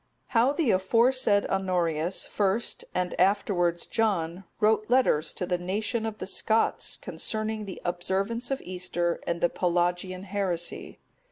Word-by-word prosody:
How 240 +3 +4
the 290 -5 +1
aforesaid 220 +3 +3
Honorius 180 -3 0
first, 205 +3 -1
and 180 0 0
afterwards 180 -3 +2
John, 190 -5 -1
wrote 215 0 +2
letters 240 -12 +3
to 180 - -2
the 180 -1 -1
nation 215 +5 -2
of 215 -1 -5
the - - -5
Scots, 220 +3 +1
concerning 215 -1 -3
the 190 - -7
observance 195 +7 -1
of 270 - -2
Easter, 180 -1 -1
and 170 0 -1
the 175 - +4
Pelagian 180 +1 0
heresy. 185 -4 -3
190 Hz, 135 wpm, -27 LUFS, 175-220 Hz, -, How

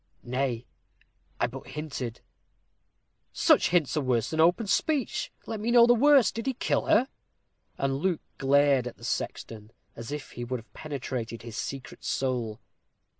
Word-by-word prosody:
"Nay, 125 -1 -2 0.7
I - - +3
but 130 +2 -7
hinted." 135 -6 -5 1.1
"Such - - +4
hints 170 -5 +2
are 155 - +1
worse 125 -4 0
than 160 - -2
open 175 +8 +4
speech. 280 +6 0
Let 220 - -4
me 220 +3 -2
know 235 -1 +7
the 240 - +6
worst. 275 +1 +5
Did 230 +3 -5
he 265 - 0
kill - - 0
her?" 240 +5 +4 0.7
And 135 0 0
Luke 180 0 0 0.2
glared 140 -2 +4
at 125 - -8
the - - -17
sexton 110 -2 -4 0.3
as 115 +4 -7
if 150 -1 -6
he 120 - -6
would 125 +1 -3
have 115 - -18
penetrated 130 -6 -5
his 115 -2 -8
secret 135 +3 -6
soul. 120 -4 -1
140 Hz, 160 wpm, -28 LUFS, 120-190 Hz, 1.1 s, know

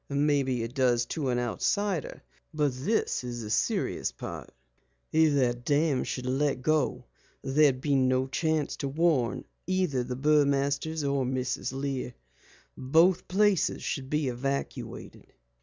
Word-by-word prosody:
"Maybe 140 -4 +1
it 115 +1 -6
does 125 -3 +2
to 145 -5 -2
an 125 - +1
outsider. 170 - -1 0.3
But 145 -3 +1
this 135 - -1
is 120 -1 -5
the 105 - -6
serious 110 - 0
part. - - -8 0.6
If 160 -2 +4
the 125 -3 +3
dam 145 +3 0
should 125 - -4
let 135 0 0
go 155 -2 +1 0.4
there'd 135 -1 +3
be 145 0 0
no 130 -1 +2
chance 155 +2 -1
to 140 - -3
warn 140 -4 +1 0.2
either 180 -9 0
the 125 +1 -4
Burmasters 145 +2 +1
or 140 -1 +1
Mrs. 125 -1 -2
Lear. 135 -2 -4 0.6
Both 165 +7 +3
places 200 -1 +2
should 130 -1 -3
be 150 -1 0
evacuated." 135 +3 -5
140 Hz, 135 wpm, -28 LUFS, 130-155 Hz, 0.6 s, If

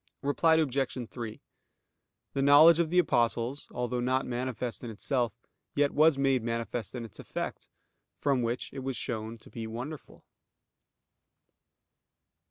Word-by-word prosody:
Reply 160 +3 +3
Obj. 135 -5 0
3: 115 -3 -6 0.9
The 135 - 0
knowledge 150 +4 +8
of 170 -2 +2
the 180 - 0
Apostles, 120 -4 +1
although 125 0 -2
not 130 +2 +1
manifest 125 -1 -3
in 120 - -5
itself, 115 0 -1 0.4
yet 145 0 +3
was 155 -1 +5
made 135 -2 +2
manifest 115 0 -3
in 120 -2 -4
its 110 - -13
effect, - - -5 0.5
from 140 -3 +1
which 120 +1 -2
it 135 - -5
was 135 -2 -3
shown 115 -2 -4
to 110 - -17
be 115 -1 -5
wonderful. 125 +7 -8
125 Hz, 135 wpm, -30 LUFS, 115-140 Hz, 0.9 s, knowledge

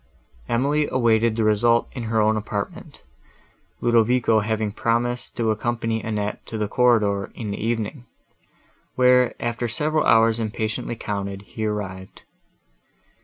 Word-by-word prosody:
Emily 145 +5 +1
awaited 115 -2 +2
the 115 - 0
result 115 +2 +3
in 125 - -6
her 110 0 0
own 110 0 +3
apartment, 105 -1 -5 0.8
Ludovico 120 -1 +3
having 110 0 -1
promised 120 +3 -1
to 115 -2 +1
accompany 115 0 -2
Annette 105 -2 -3
to 110 - -5
the 105 -1 -1
corridor, 105 -4 +2
in 110 -3 -5
the 100 - -5
evening; 115 +2 -3 0.9
where, 125 -1 +4
after 120 0 -2
several 150 +6 0
hours 115 0 +4
impatiently 110 +1 -3
counted, 100 -2 -4
he 110 +1 -4
arrived. 95 -3 -6
115 Hz, 125 wpm, -23 LUFS, 105-120 Hz, 0.9 s, where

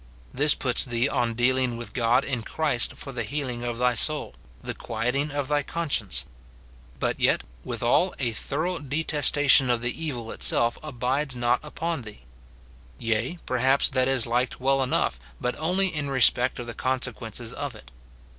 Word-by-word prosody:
"* - - -25
This 145 +2 +3
puts 125 -3 +3
thee 120 +1 0
on 115 -4 0
deal 125 +2 +3
ing 125 -2 0
with 120 - -7
God 120 +2 +2
in 125 -4 -2
Christ 135 0 0
for 135 - -7
the 120 -2 -4
healing 125 0 -3
of 120 -1 -3
thy 125 0 +2
soul, 150 +6 0 0.3
the - - -5
quieting 125 +6 -2
of 145 -2 -2
thy 145 +1 +1
conscience; 145 - -2 0.7
but - - -1
yet, - - +2 0.2
withal, 150 +10 +1
a 120 -4 0
thorough 160 +10 -2
detestation 145 -2 +3
of 120 -1 +1
the 120 - 0
evil 120 -7 -4
itself 120 0 +2
abides 135 0 -2
not 120 0 +2
upon 160 +1 -3
thee; 105 -3 -11 0.8
yea, 115 +9 -1
perhaps 130 +2 +3
that 130 -1 +1
is 135 -3 +2
liked 120 +1 -1
well 135 +1 +2
enough, 125 - 0 0.2
but 125 - -1
only 185 +4 +1
in 150 -2 -2
respect 130 -1 +4
of 120 - -5
the 120 - -6
consequences 125 -3 -3
of 145 -3 -5
it. 65 -12 -14
130 Hz, 170 wpm, -26 LUFS, 120-145 Hz, 0.8 s, respect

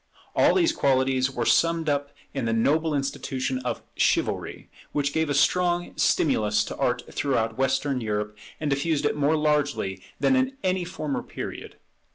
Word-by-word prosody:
All - - +4
these 340 -3 +4
qualities 130 - +2
were 120 -3 -3
summed 165 -1 +3
up 145 -1 0 0.2
in 135 -4 -2
the 115 - 0
noble 150 +7 +2
institution 135 -2 -2
of 125 -1 -4
Chivalry; - - 0 0.3
which 145 -1 0
gave 160 -1 0
a 145 - 0
strong 175 +4 +2
stimulus 105 -7 +2
to - - -6
Art 125 0 0
throughout 115 -5 0
Western 135 +1 0
Europe, 105 -1 -2 0.2
and 150 -2 -1
diffused 145 +2 0
it - - +1
more 150 +2 +2
largely 145 -11 0 0.2
than 265 - +3
in 260 +1 0
any 185 -1 0
former 155 -5 -3
period. - - -7
140 Hz, 160 wpm, -25 LUFS, 130-160 Hz, 0.3 s, All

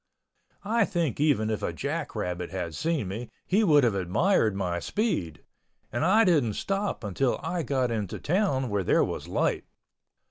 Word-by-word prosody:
I 225 +2 +3
think 170 - -1
even 135 -8 +2
if 110 - -2
a - - -1
jack - - -4
rabbit 90 -1 -3
had 90 -3 -4
seen 160 - -1
me 110 +5 -5 0.2
he 205 +4 +2
would 150 -7 +5
have 120 -4 +3
admired 105 - +2
my 90 -3 -1
speed, 90 - -2 0.5
and 120 - -1
I 210 +7 +5
didn't 150 - +3
stop 195 - -2
until 115 +6 0
I 170 +2 -1
got 130 -4 0
into 105 -5 -3
town 150 - 0
where 100 -2 0
there - - +3
was - - -4
light. - - 0
130 Hz, 170 wpm, -27 LUFS, -, 0.5 s, would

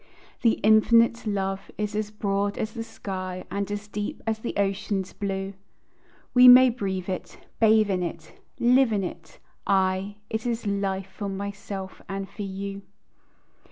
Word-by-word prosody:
The 230 -2 +4
infinite 230 +2 +5
love 195 -1 -2
is 210 0 -2
as 210 0 -1
broad 200 -1 -1
as 215 - -3
the 230 -2 -4
sky, 185 -4 -6
And 200 0 -2
as 205 0 -4
deep 210 0 -4
as 220 -1 -1
the 235 - -5
ocean's 195 -1 -1
blue, 195 -1 -3 0.8
We 250 0 +8
may 250 0 +9
breathe 190 -6 -3
it, 185 -2 -5 0.2
bathe 220 -2 +5
in 185 -1 0
it, 165 -2 -5 0.3
live 250 0 +4
in 205 -2 0
it, 175 -2 -8 0.3
aye, 190 +1 +1
It 220 +2 -3
is 235 -1 -2
life 195 -1 -1
for 200 -2 -4
myself 195 -1 -6
and 195 0 -4
for 210 - -10
you. 195 0 -5
200 Hz, 155 wpm, -26 LUFS, 195-220 Hz, 0.8 s, may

